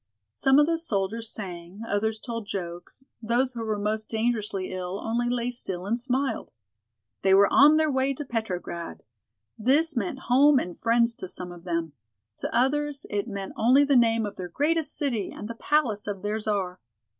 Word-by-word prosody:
Some 270 - +4
of 295 - +6
the 330 +1 0
soldiers 225 - -2
sang, 180 0 -7
others 220 +1 0
told 230 -3 -6
jokes, 175 +6 -6 0.2
those 245 +3 +1
who 230 -1 -4
were 215 -1 -1
most 215 +1 -2
dangerously 220 -5 -1
ill 185 +1 -4
only 235 +2 -1
lay 245 0 -1
still 190 -7 -4
and 230 +4 0
smiled. 255 0 -1 0.7
They 190 0 +5
were 200 +1 +6
on 300 +3 +7
their 310 -1 +2
way 265 +1 +1
to 295 - -6
Petrograd! 185 -8 -4 0.6
This 285 +7 +3
meant 235 +4 -2
home 275 +3 +5
and 180 -8 -2
friends 235 0 +2
to 185 -8 -7
some 180 -1 -4
of 175 0 -12
them. 170 -3 -2 0.4
To - - -3
others 290 +2 +1
it 205 +2 -1
meant 200 -3 -5
only 255 +5 +5
the 285 -1 +2
name 230 -2 +4
of 205 - -7
their 180 -1 -5
greatest 300 - 0
city 240 -9 -1
and 210 - -7
the 230 - -5
palace 230 -5 0
of 200 -2 -4
their 210 +1 -1
Czar. 195 -4 -2
225 Hz, 180 wpm, -26 LUFS, 195-265 Hz, 0.7 s, on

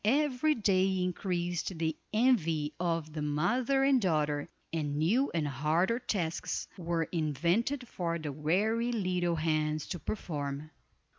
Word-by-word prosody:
Every 290 +5 +2
day 190 -3 +2
increased 175 -1 -2
the 160 -1 0 0.2
envy 165 -11 +2
of 165 -3 -1
the 155 - -3
mother 245 - +1
and 270 -2 +4
daughter, 150 -5 0 0.2
and 150 -3 -1
new 220 - +2
and 160 -3 0
harder 155 - +1
tasks 175 -9 -2
were 170 -2 -1
invented 170 - 0
for 170 -5 -2
the 155 -3 -4
weary 205 - +1
little 180 -6 0
hands 155 -1 0
to 175 - -3
perform. 150 -6 -4
175 Hz, 130 wpm, -31 LUFS, 155-215 Hz, 0.2 s, and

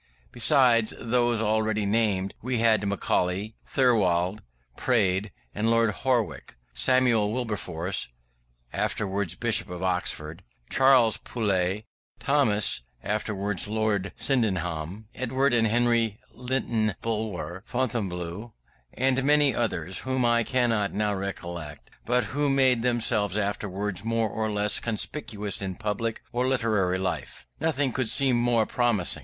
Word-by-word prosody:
Besides 120 -3 +3
those 120 -1 +1
already 110 -1 +1
named, 100 -2 +1
we 125 +2 -1
had 110 -2 +3
Macaulay, 100 +1 -1
Thirlwall, 100 -7 +2 0.4
Praed, 100 -5 +1 0.2
Lord 115 0 +2
Howick, 125 - -1 0.2
Samuel 125 -5 +3
Wilberforce 100 - -2 0.7
(afterwards 100 -3 -1
Bishop 115 -3 0
of 90 0 -6
Oxford), 90 -2 -2 0.3
Charles 130 -5 +5
Poulett 100 -3 -1 0.4
Thomson 110 - +2 0.2
(afterwards 105 -2 -1
Lord 105 -3 -1
Sydenham), 95 - -1
Edward 130 +2 0
and 115 -2 +3
Henry 115 -1 +2
Lytton 120 -5 -1
Bulwer, 105 -5 -3
Fonblanque, 105 -4 -3 0.4
and 130 +1 +1
many 145 -1 +4
others 95 -6 -2
whom 130 -1 -1
I 120 0 +3
cannot 115 -4 0
now 105 0 0
recollect, 85 -6 -6 0.2
but 125 +1 +2
who 145 +1 -1
made 130 -3 +3
themselves 115 -4 +1
afterwards 100 -1 -2
more 115 -1 0
or 110 0 -2
less 105 -1 +2
conspicuous 105 -3 -2
in 95 -2 -4
public 110 +2 -3
or 125 +1 0
literary 110 -8 +1
life. 95 -1 -4
Nothing 145 -4 0
could 130 -4 0
seem 135 +1 +3
more 120 -2 +2
promising. 120 -8 0
110 Hz, 115 wpm, -26 LUFS, 100-120 Hz, 0.7 s, Charles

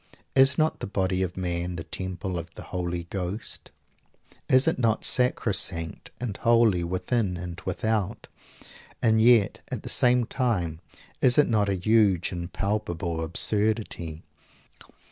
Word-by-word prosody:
Is 135 +1 +5
not 155 0 +1
the - - -5
body 95 -2 -1
of 90 -1 -3
man 90 -1 -2
the 85 - -5
temple 90 +1 -4
of 85 0 -9
the - - -8
Holy 90 -1 -4
Ghost? 95 +3 -5 0.8
Is 130 +1 +5
it - - +1
not 115 -3 +1
sacrosanct 100 -9 +1
and 120 -5 -4
holy 115 -6 +3
within 90 +2 -1
and 85 0 -7
without; 105 +2 -2 0.7
and 110 -1 +3
yet, 115 -4 +4
at - - -4
the - - -5
same 125 -1 +4
time, 90 - -1 0.4
is 125 -1 +4
it 150 - +5
not 105 -3 +1
a 100 - +1
huge 95 -2 +2
and 85 -1 -5
palpable 85 -5 -2
absurdity? 95 -2 -1
95 Hz, 140 wpm, -26 LUFS, 85-115 Hz, 0.8 s, Is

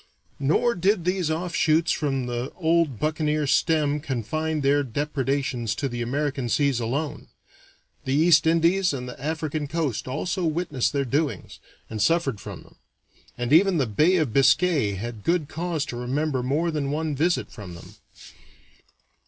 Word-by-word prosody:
Nor 160 - +2
did 185 -1 +1
these 180 -3 0
offshoots 160 -1 +1
from 135 -4 -1
the 120 +1 -3
old 165 -6 +1
buccaneer 155 -1 0
stem 145 +2 +2
confine 155 +3 -2
their 140 +1 +3
depredations 135 -3 -2
to 140 - -2
the 120 -2 -5
American 135 0 -2
seas 140 -1 +2
alone; 140 +6 -3 0.8
the 130 - -1
East 160 +1 +5
Indies 170 +2 +3
and 125 -2 -5
the 125 +1 -9
African 155 -1 -2
coast 145 -8 -2
also 180 +8 -2
witnessed 155 -5 0
their 140 -1 -1
doings, 135 - -2 0.3
and 110 -1 -5
suffered 155 -8 +1
from - - -8
them, - - -22 0.6
and 120 +3 -1
even 185 +2 +5
the 140 - +2
Bay 150 - +3
of 155 -10 0
Biscay 140 - +3
had 110 +2 -6
good 170 -3 +1
cause 165 -2 -3
to 125 - -6
remember 130 +3 -1
more 150 +7 0
than 145 -3 -2
one 155 0 -2
visit 170 +5 0
from 95 -6 -9
them. 85 - -13
150 Hz, 150 wpm, -25 LUFS, 130-160 Hz, 0.8 s, East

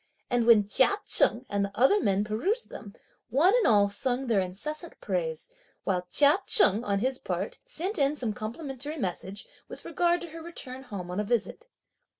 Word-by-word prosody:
And 240 -1 +1
when 215 -4 +6
Chia 260 - +3
Cheng 240 +3 +2
and 200 0 -1
the 200 - -3
other 270 - +4
men 200 - +1
perused 335 - -2
them, 205 0 -10 0.3
one 320 +9 +3
and 475 - +2
all 205 -2 +4
sung 245 +6 -1
their 225 -5 +1
incessant 300 - -5
praise, 485 -1 -3 0.4
while 180 -2 -2
Chia 295 +5 +5
Cheng, 220 - +5
on 200 -3 0
his 260 +2 0
part, - - -4
sent 405 -5 -3
in 280 +1 +2
some 240 -7 -2
complimentary 270 +7 -6
message, 190 - -5 0.2
with - - -11
regard 345 0 +1
to 345 - -7
her 330 +1 -9
return 265 -6 -7
home 190 -8 -7
on 180 - -3
a - - 0
visit. 240 - -2
250 Hz, 180 wpm, -27 LUFS, 205-330 Hz, 0.4 s, when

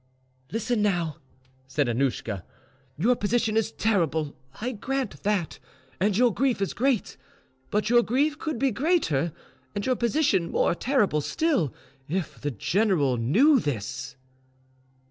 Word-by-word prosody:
"Listen 225 +1 0
now," 175 -7 0 0.5
said 135 +1 0
Annouschka: 115 -6 -1 0.5
"your 230 +11 +3
position 220 0 0
is 225 0 +1
terrible, 160 -10 0 0.2
I 245 +3 -2
grant 260 +1 -3
that, 200 -5 -1 0.4
and 200 +1 +2
your 245 -2 +4
grief 255 -2 +1
is 195 - -1
great; 255 -2 0 0.5
but 210 0 0
your 240 +1 +5
grief 285 +6 +1
could 310 -5 -3
be 270 +2 +2
greater 235 - +1 0.4
and 205 - -2
your 255 - +2
position 235 - +1
more - - +2
terrible 210 - +1
still. 275 - +1 0.4
If 155 -8 -3
the 145 - -1
general 145 - +1
knew 235 - +4
this." 125 - -4
210 Hz, 130 wpm, -26 LUFS, 155-250 Hz, 0.5 s, your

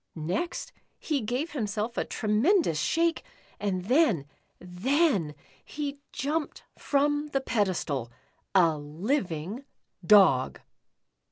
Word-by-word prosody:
Next 185 - -3 0.3
he 295 -4 -1
gave 250 +9 -2
himself 220 -3 -3
a - - 0
tremendous 220 - +1
shake, 330 - +1 0.4
and 185 -3 -2
then 240 - +3 0.3
— - - -46
then 190 - 0
— 135 - -28
he 285 -1 -5
jumped 300 +2 -3
from 290 +1 +1
the 270 - +2
pedestal 180 - -1 0.2
— - - -44
a 155 -2 -2
liv 180 - -2
ing 180 - -5 0.4
Dog! 175 -10 +5
215 Hz, 115 wpm, -28 LUFS, 175-290 Hz, 0.4 s, Dog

